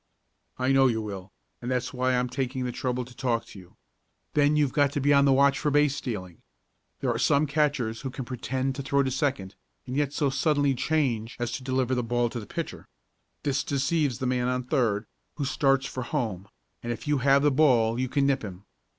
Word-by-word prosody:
"I 130 +1 +1
know 135 -1 +5
you 115 -3 0
will, 100 -3 -6 0.3
and 120 - -4
that's 125 0 -1
why 130 0 +1
I'm 125 0 +1
taking 130 0 -3
the 125 - -2
trouble 125 0 -2
to 125 0 -15
talk 120 -3 -1
to 105 - -12
you. 90 -2 -17 0.6
Then 145 0 +3
you've 145 -4 +2
got 145 -2 +3
to - - 0
be 145 +1 +3
on 140 0 +5
the 140 - +4
watch 140 +1 +4
for 150 - 0
base 145 -1 +3
stealing. 95 - -6 0.6
There - - +1
are - - -2
some 145 +2 +3
catchers 140 -6 0
who 135 - -4
can 130 0 -6
pretend 130 +2 -2
to 140 - -5
throw 140 +1 +1
to 130 - -1
second, 130 -9 -1 0.3
and 125 - -5
yet 145 -1 +1
so 145 -2 0
suddenly 145 +1 +2
change 125 -5 -1
as 120 -1 -2
to 130 +2 -5
deliver 130 -1 0
the 125 - +1
ball 120 +1 0
to 120 - -4
the 105 - -9
pitcher. - - -6 0.6
This 140 -1 0
deceives 140 -2 0
the 130 - -3
man 125 -1 0
on 125 0 -1
third, 120 -6 0 0.3
who 145 - -2
starts 135 -1 +2
for 130 - -5
home, 115 - -3 0.3
and 120 - -4
if 120 +4 -6
you 145 -2 +2
have 140 +2 +4
the 145 - +4
ball 125 -5 +3
you 130 0 -1
can 140 +1 +1
nip 140 -1 +2
him. 95 -1 -8
130 Hz, 220 wpm, -27 LUFS, 120-140 Hz, 0.6 s, know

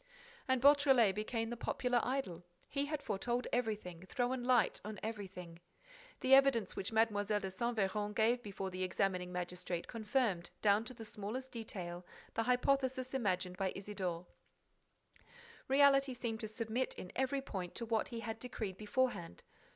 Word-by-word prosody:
And 260 -1 +3
Beautrelet 270 -7 +6
became 225 +2 -2
the - - -2
popular 245 0 0
idol. 240 -10 -2 0.3
He 280 0 0
had 300 -1 -3
foretold 240 +3 -1
everything, 210 -8 -2
thrown 245 +3 -1
light 245 -2 +3
on 210 -1 -6
everything. 190 -6 -6 0.6
The 260 - +4
evidence 270 -7 +5
which 195 - -3
Mlle. 220 -2 +3
de 205 -2 -1
Saint 235 +5 -2
Véran 205 +1 0
gave 235 +3 +3
before 195 -3 -5
the 185 0 -5
examining 185 0 0
magistrate 180 -1 -3
confirmed, 215 -6 0
down 210 +1 +4
to 255 +1 -7
the 225 - -8
smallest 220 +6 -5
detail, 180 -6 -6 0.3
the 225 - +1
hypothesis 260 +1 +1
imagined 185 -7 0
by 190 -1 -1
Isidore. 190 -3 -4 1.4
Reality 275 -1 +5
seemed 230 -2 -3
to 220 - -4
submit, 225 +3 -2
in 180 - -8
every 265 +1 +1
point, 185 -8 -5
to 235 - -2
what 225 -1 +1
he 235 -1 -5
had 225 0 -4
decreed 220 -6 -4
beforehand. 210 - -1
220 Hz, 150 wpm, -36 LUFS, 190-250 Hz, 1.4 s, Beautrelet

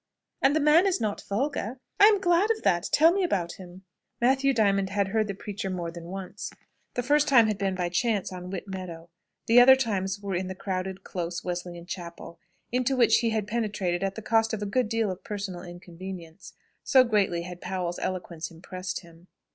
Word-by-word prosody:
"And 275 +2 +4
the - - +3
man 310 +5 +5
is 375 - +1
not 215 -3 -2
vulgar? 250 +2 -2 0.2
I 405 - +9
am 420 -2 +4
glad 360 +2 +3
of 450 -1 0
that! 175 -1 +2
Tell 320 +3 +6
me 390 0 +1
about 180 - -1
him." 185 0 -11 0.4
Matthew 270 +3 +3
Diamond 200 -5 +2
had 200 0 0
heard 215 +1 +1
the 200 - -4
preacher 200 0 -5
more 175 -2 -3
than 170 0 -9
once. 190 +1 -6 0.4
The 245 - -1
first 295 +3 +3
time 240 -5 +6
had 215 -2 -1
been 195 -1 0
by 180 -1 -1
chance 205 +1 0
on 180 0 -7
Whit 190 +1 -5
Meadow. 175 -3 -7 0.3
The 235 +2 +7
other 265 +2 +9
times 200 -6 -1
were 200 -1 -4
in 185 +1 -1
the 190 - -5
crowded, 190 0 -4
close 175 -1 -4
Wesleyan 175 -1 -5
chapel, 170 -2 -8 0.3
into 255 +2 +1
which 235 -2 +5
he 230 - +1
had 220 -2 -1
penetrated 210 -5 -1
at 195 0 -1
the 220 - -7
cost 225 0 +2
of 210 - -5
a - - -2
good 210 +2 0
deal 225 -3 0
of 185 - -8
personal 195 -4 -5
inconvenience, 175 0 -9 0.3
so 260 -2 +6
greatly 200 -7 +1
had 180 0 -9
Powell's 180 -1 -3
eloquence 170 -3 -4
impressed 185 +3 -6
him. 170 0 -18
195 Hz, 205 wpm, -27 LUFS, 180-235 Hz, 0.4 s, I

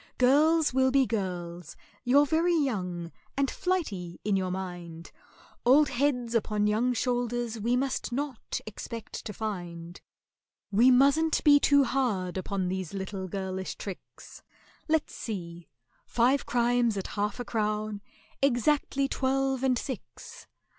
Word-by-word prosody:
"Girls 300 +4 +4
will 260 0 +3
be 270 0 +4
girls—you're 185 - -1
very 330 +4 +2
young, 180 - -2 0.3
and 275 -1 +1
flighty 210 - -2
in 205 -2 +2
your 185 -1 0
mind; 175 -3 -6 0.5
Old 280 +4 +5
heads 250 -3 0
upon 210 -2 +1
young 220 +4 +2
shoulders 240 -1 -1
we 235 +4 +1
must 260 0 -1
not 275 -1 -3
expect 220 +1 -7
to 215 - -4
find: 175 -5 -6 0.7
We 230 +6 +5
mustn't 280 +5 +4
be 290 -1 +7
too 285 0 +5
hard 235 -9 -1
upon 190 0 -2
these 185 0 -4
little 190 0 -4
girlish 190 0 -4
tricks— 195 -3 -10 0.5
Let's 315 -1 +1
see—five 230 - -3
crimes 240 -2 +2
at 195 - -4
half 205 +2 -2
a 245 - -4
crown—exactly 225 +6 -1
twelve 270 -1 0
and 255 -2 +3
six." 260 -1 -8
235 Hz, 120 wpm, -28 LUFS, 190-270 Hz, 0.7 s, be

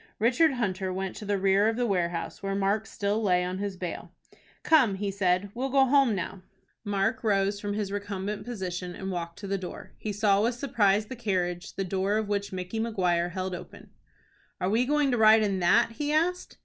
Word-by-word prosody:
Richard 260 +8 +3
Hunter 190 -6 -2
went 190 0 -4
to 210 - -7
the 205 0 0
rear 195 +2 +3
of 225 - -1
the 245 +1 0
warehouse 175 -5 -2
where 195 0 -2
Mark 200 +2 0
still 205 +2 -1
lay 180 -4 +2
on 180 +1 -3
his 200 -2 -3
bale. 180 -1 -6 0.5
"Come," 260 -11 +4
he 200 +1 -2
said; 190 0 0
"we'll 260 +3 -2
go 270 0 +4
home 265 -4 +4
now." 190 0 -5 0.4
Mark 205 +3 -1
rose 200 -1 +1
from 205 0 -3
his 205 -2 -2
recumbent 205 0 -4
position, 185 -6 -5
and 190 0 -5
walked 170 -2 -5
to 205 - -8
the 195 0 -1
door. 180 -1 -8
He 215 - -3
saw 205 -1 +2
with 235 +2 +1
surprise 215 -6 +2
the 260 - -7
carriage, 180 -6 -2
the 195 - -1
door 195 +2 0
of 215 -1 -1
which 200 -1 -1
Micky 185 +4 -4
Maguire 180 -6 0
held 185 +1 -4
open. 180 - -10 0.7
"Are 185 +2 0
we 235 +4 +2
going 295 -1 +2
to 245 - +1
ride 220 0 +7
in 195 -2 0
that?" 230 +6 +4
he 290 +6 -3
asked. 345 +4 0
200 Hz, 205 wpm, -27 LUFS, 190-225 Hz, 0.7 s, ride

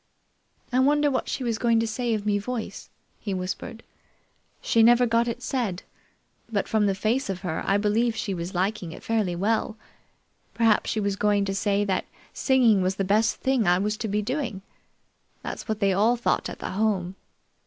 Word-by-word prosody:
"I 255 - +3
wonder 290 +2 +3
what 260 - -2
she 265 - -3
was 230 -2 -1
going 230 -1 +3
to 225 - +1
say 230 +1 -1
of 210 -1 -5
me 205 -1 +1
voice," 235 +2 -5 0.3
he 200 -3 -3
whispered. 185 +5 -5 0.8
"She 230 - +2
never 240 +2 +6
got 230 0 +2
it 240 +1 -4
said, 225 -10 -2 0.7
but 205 -3 -1
from 215 -2 +2
the 195 - +1
face 220 +5 0
of 185 -2 -3
her, 175 -4 -3
I 200 - +3
believe 220 +3 +1
she 210 -3 -3
was 175 +2 -5
liking 185 -2 -1
it - - -11
fairly 215 -6 0
well. 215 +4 0 0.8
Perhaps 225 -2 +3
she 220 - -1
was 200 -1 0
going 205 0 +2
to 195 - -2
say 200 +1 +1
that 190 -2 -1 0.3
singing 240 -7 +3
was 185 +1 0
the 195 - -1
big 210 +4 +3
thing 260 -3 0
I 175 0 +5
was 210 +3 -1
to 220 - -3
be 210 +1 -1
doing. 235 -5 -3 0.8
That's - - -6
what 220 -2 -2
they 200 -2 +2
all 215 +6 +3
thought 240 - 0
at - - -7
the - - -5
Home. 190 -3 0
215 Hz, 195 wpm, -25 LUFS, 195-235 Hz, 0.8 s, never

